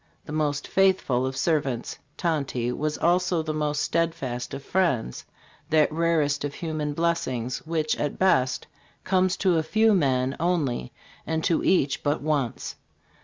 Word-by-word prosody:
The -, -, -8 dB
most 150 Hz, -2 st, -1 dB
faithful 185 Hz, -10 st, +2 dB
of 135 Hz, 0 st, -5 dB
servants, 140 Hz, -5 st, -1 dB, 0.2 s
Tonty 140 Hz, -8 st, -1 dB
was 150 Hz, +4 st, -2 dB
also 175 Hz, -1 st, +2 dB
the 155 Hz, 0 st, -3 dB
most 150 Hz, -1 st, -1 dB
steadfast 160 Hz, -8 st, -1 dB
of 135 Hz, -, -8 dB
friends 140 Hz, -, 0 dB, 0.4 s
that 155 Hz, -2 st, +4 dB
rarest 160 Hz, -4 st, +1 dB
of 145 Hz, -1 st, -4 dB
human 155 Hz, -3 st, -3 dB
blessings, 145 Hz, -7 st, -1 dB
which 155 Hz, -2 st, 0 dB
at 145 Hz, -, -2 dB
best 130 Hz, -9 st, +2 dB, 0.4 s
comes 185 Hz, -1 st, +2 dB
to 180 Hz, -4 st, +2 dB
a -, -, +2 dB
few 220 Hz, +7 st, +3 dB
men 135 Hz, -6 st, +1 dB
only, 155 Hz, -, 0 dB, 0.4 s
and 160 Hz, 0 st, -1 dB
to 165 Hz, -, +1 dB
each 140 Hz, -7 st, +2 dB
but 145 Hz, +1 st, 0 dB
once. 145 Hz, -5 st, -2 dB
155 Hz, 145 wpm, -25 LUFS, 135-170 Hz, 0.4 s, that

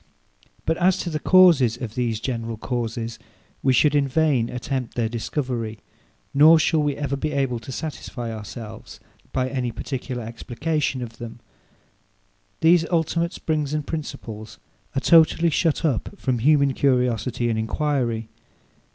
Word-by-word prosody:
But 160 Hz, -, +1 dB
as 185 Hz, +1 st, +3 dB
to 175 Hz, -, -4 dB
the 155 Hz, -, -2 dB
causes 160 Hz, -11 st, +5 dB
of 115 Hz, -4 st, -5 dB
these 115 Hz, -3 st, -1 dB
general 115 Hz, -2 st, -3 dB
causes, 115 Hz, -1 st, -3 dB, 0.4 s
we 130 Hz, -, +3 dB
should 145 Hz, +4 st, +4 dB
in 145 Hz, -1 st, +2 dB
vain 135 Hz, -4 st, +2 dB
attempt 125 Hz, -1 st, -4 dB
their 115 Hz, -2 st, 0 dB
discovery; 115 Hz, -1 st, -3 dB, 0.6 s
nor 155 Hz, +4 st, +7 dB
shall 160 Hz, 0 st, +2 dB
we 145 Hz, -2 st, 0 dB
ever 140 Hz, -1 st, -2 dB
be 150 Hz, +2 st, -3 dB
able 135 Hz, -4 st, 0 dB
to 125 Hz, -, -9 dB
satisfy 125 Hz, -5 st, -5 dB
ourselves, 110 Hz, +1 st, -9 dB, 0.3 s
by 130 Hz, -1 st, 0 dB
any 130 Hz, -2 st, -2 dB
particular 125 Hz, 0 st, -5 dB
explication 130 Hz, +4 st, -2 dB
of 115 Hz, -1 st, -9 dB
them. 120 Hz, 0 st, -8 dB, 1.2 s
These 165 Hz, 0 st, +5 dB
ultimate 170 Hz, 0 st, 0 dB
springs 150 Hz, -2 st, -2 dB
and 150 Hz, -2 st, -2 dB
principles 115 Hz, -9 st, -6 dB, 0.4 s
are -, -, +2 dB
totally 165 Hz, +1 st, +5 dB
shut 165 Hz, +2 st, +1 dB
up 155 Hz, -, -1 dB
from 130 Hz, -7 st, -1 dB
human 140 Hz, +1 st, +4 dB
curiosity 125 Hz, -3 st, +1 dB
and 110 Hz, -, -1 dB
enquiry. 115 Hz, -2 st, -1 dB
130 Hz, 145 wpm, -23 LUFS, 115-155 Hz, 1.2 s, nor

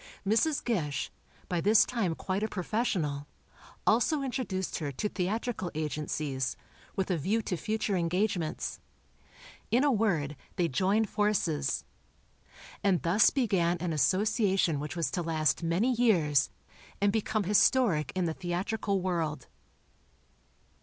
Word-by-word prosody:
Mrs. 275 Hz, +8 st, +2 dB
Gish, 150 Hz, -, -1 dB, 0.4 s
by 175 Hz, -2 st, -1 dB
this 210 Hz, +4 st, +5 dB
time 205 Hz, -9 st, -1 dB
quite 190 Hz, +4 st, -2 dB
a 215 Hz, -, +1 dB
professional, 180 Hz, -, -2 dB, 0.6 s
also 275 Hz, +7 st, +3 dB
introduced 245 Hz, -8 st, -3 dB
her 145 Hz, -3 st, -3 dB
to 210 Hz, -, -1 dB
theatrical 205 Hz, +1 st, -2 dB
agencies, 150 Hz, -3 st, -2 dB, 0.4 s
with 190 Hz, 0 st, -1 dB
a 175 Hz, -, 0 dB
view 215 Hz, +9 st, 0 dB
to 185 Hz, -, -2 dB
future 215 Hz, +2 st, -1 dB
engagements. 180 Hz, -1 st, -1 dB, 0.9 s
In 245 Hz, +4 st, +3 dB
a 290 Hz, -, +4 dB
word, 175 Hz, -, +1 dB, 0.2 s
they 175 Hz, -3 st, +1 dB
joined 195 Hz, +9 st, +1 dB
forces. 190 Hz, -9 st, 0 dB, 1.0 s
And 195 Hz, -4 st, +2 dB
thus 180 Hz, +6 st, +5 dB
began 190 Hz, -10 st, +1 dB
an 170 Hz, -1 st, -2 dB
association 190 Hz, -, +2 dB
which 150 Hz, +3 st, -5 dB
was 170 Hz, -3 st, -1 dB
to 180 Hz, -, -1 dB
last 155 Hz, -4 st, +1 dB
many 175 Hz, +9 st, +1 dB
years, 170 Hz, -, +3 dB, 0.5 s
and 200 Hz, 0 st, +2 dB
become 215 Hz, -1 st, 0 dB
historic 195 Hz, -, +3 dB
in 185 Hz, -1 st, +1 dB
the 165 Hz, -, -1 dB
theatrical 190 Hz, +3 st, -2 dB
world. 165 Hz, -5 st, -2 dB
185 Hz, 125 wpm, -30 LUFS, 160-215 Hz, 1.0 s, this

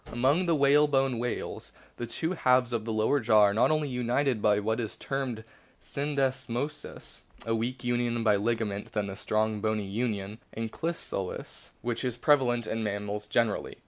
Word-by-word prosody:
Amoncr 140 Hz, +10 st, +2 dB
the 165 Hz, -, +3 dB
whalebone 140 Hz, -3 st, +3 dB
whales 120 Hz, 0 st, -4 dB, 0.3 s
the 120 Hz, -, -4 dB
two 160 Hz, +8 st, -1 dB
halves 125 Hz, -7 st, +3 dB
of 115 Hz, -, 0 dB
o -, -, -12 dB
the 115 Hz, -, -2 dB
lower 110 Hz, +6 st, +2 dB
jaw 110 Hz, -3 st, +5 dB
are 100 Hz, +1 st, +3 dB
only 155 Hz, +3 st, +3 dB
united 125 Hz, -1 st, 0 dB
by 105 Hz, 0 st, +4 dB
what 110 Hz, +3 st, -1 dB
is 110 Hz, -3 st, -4 dB
termed 130 Hz, -5 st, -3 dB, 0.4 s
syndesmosis, 140 Hz, 0 st, -3 dB, 0.2 s
a 115 Hz, -, 0 dB
weaker 120 Hz, +3 st, -2 dB
union 120 Hz, -1 st, 0 dB
by 105 Hz, -2 st, +4 dB
ligaments 105 Hz, -1 st, -1 dB
than 105 Hz, -2 st, -1 dB
the 95 Hz, -1 st, -5 dB
strong, 110 Hz, +1 st, 0 dB
bony 110 Hz, -1 st, 0 dB
union 105 Hz, 0 st, -3 dB
(" -, -, -18 dB
ankylosis 115 Hz, -, -4 dB
"), -, -, -37 dB
which 120 Hz, +1 st, -2 dB
is 125 Hz, -2 st, -2 dB
prevalent 120 Hz, -4 st, +3 dB
in 115 Hz, +1 st, -2 dB
mammals 105 Hz, 0 st, -3 dB
generally. 115 Hz, 0 st, 0 dB
120 Hz, 170 wpm, -29 LUFS, 110-135 Hz, 0.4 s, jaw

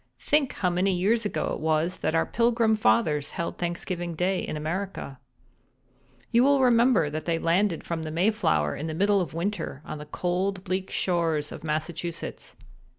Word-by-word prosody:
Think 290 Hz, -3 st, +1 dB
how 180 Hz, -2 st, 0 dB
many 185 Hz, +2 st, +1 dB
years 215 Hz, +5 st, +2 dB
ago 205 Hz, -, -1 dB
it -, -, -4 dB
was 160 Hz, +3 st, 0 dB
that 160 Hz, -, -1 dB
our 165 Hz, -, +3 dB
Pilgrim 230 Hz, -2 st, +2 dB
Fathers 145 Hz, -, +2 dB
held 170 Hz, -, -3 dB
Thanksgiving 175 Hz, 0 st, -3 dB
Day 180 Hz, +3 st, 0 dB
in 155 Hz, -, -4 dB
America. 160 Hz, -3 st, -4 dB, 1.1 s
"You 240 Hz, 0 st, +5 dB
will 280 Hz, +1 st, +4 dB
remember 235 Hz, -, +4 dB
that 155 Hz, +1 st, -4 dB
they 170 Hz, -1 st, +1 dB
landed 170 Hz, +2 st, +1 dB
from 170 Hz, -1 st, -3 dB
the 160 Hz, -, -4 dB
Mayflower 165 Hz, -, +1 dB
in 155 Hz, -, -4 dB
the 155 Hz, -, -4 dB
middle 200 Hz, +2 st, +3 dB
of 170 Hz, -, -5 dB
winter 170 Hz, -5 st, -3 dB
on 155 Hz, -, -6 dB
the 150 Hz, -, -9 dB
cold 185 Hz, +4 st, -1 dB
bleak 185 Hz, 0 st, -2 dB
shores 165 Hz, -4 st, 0 dB
of -, -, -8 dB
Massachusetts. 160 Hz, +2 st, -4 dB
175 Hz, 170 wpm, -26 LUFS, 160-200 Hz, 1.1 s, You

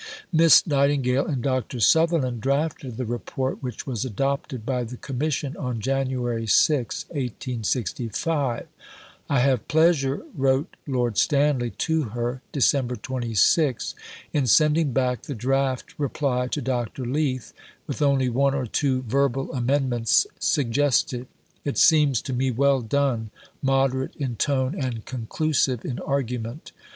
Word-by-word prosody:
Miss 165 Hz, 0 st, +7 dB
Nightingale 140 Hz, -3 st, +2 dB
and 135 Hz, -7 st, -2 dB
Dr. 130 Hz, -2 st, -1 dB
Sutherland 145 Hz, -, +3 dB
drafted 140 Hz, -2 st, -1 dB
the 125 Hz, -, -2 dB
Report, 125 Hz, +3 st, -3 dB
which 125 Hz, -2 st, -5 dB
was 125 Hz, -4 st, -3 dB
adopted 135 Hz, 0 st, -2 dB
by 125 Hz, -2 st, -1 dB
the 120 Hz, +2 st, -7 dB
Commission 140 Hz, +2 st, -2 dB
on 125 Hz, -5 st, -3 dB
January 125 Hz, -2 st, -1 dB
6, 125 Hz, +3 st, +2 dB
1865. 125 Hz, -, -2 dB, 0.6 s
"I 140 Hz, -, +3 dB
have 130 Hz, -4 st, +1 dB
pleasure," 155 Hz, -4 st, +2 dB
wrote 135 Hz, 0 st, +1 dB
Lord 120 Hz, -5 st, 0 dB
Stanley 140 Hz, -4 st, +2 dB
to 160 Hz, -1 st, +1 dB, 0.2 s
her 120 Hz, +2 st, -2 dB
(Dec. 130 Hz, -3 st, +1 dB
26), 130 Hz, +3 st, +1 dB, 0.4 s
"in 140 Hz, -4 st, +1 dB
sending 150 Hz, +3 st, +4 dB
back 125 Hz, -1 st, 0 dB
the 140 Hz, -, -6 dB
draft 130 Hz, +2 st, -1 dB
reply 135 Hz, -3 st, 0 dB
to 145 Hz, -, -3 dB
Dr. 125 Hz, 0 st, -2 dB
Leith 130 Hz, -1 st, -2 dB, 0.3 s
with -, -, -5 dB
only 140 Hz, -3 st, +3 dB
one 135 Hz, +3 st, +2 dB
or 135 Hz, -2 st, -1 dB
two 130 Hz, +2 st, 0 dB
verbal 135 Hz, +2 st, 0 dB
amendments 125 Hz, -3 st, +2 dB
suggested. 130 Hz, -2 st, +1 dB, 0.4 s
It 145 Hz, -, -3 dB
seems 150 Hz, -7 st, +4 dB
to 130 Hz, -, -4 dB
me 130 Hz, +1 st, +1 dB
well 135 Hz, +2 st, +2 dB
done, 120 Hz, -2 st, 0 dB, 0.3 s
moderate 135 Hz, -1 st, +1 dB
in 130 Hz, -5 st, -3 dB
tone, 130 Hz, +2 st, +1 dB
and 125 Hz, -, -4 dB
conclusive 130 Hz, +1 st, -1 dB
in 125 Hz, -, -3 dB
argument." 125 Hz, -1 st, -3 dB
130 Hz, 130 wpm, -24 LUFS, 125-140 Hz, 0.6 s, Miss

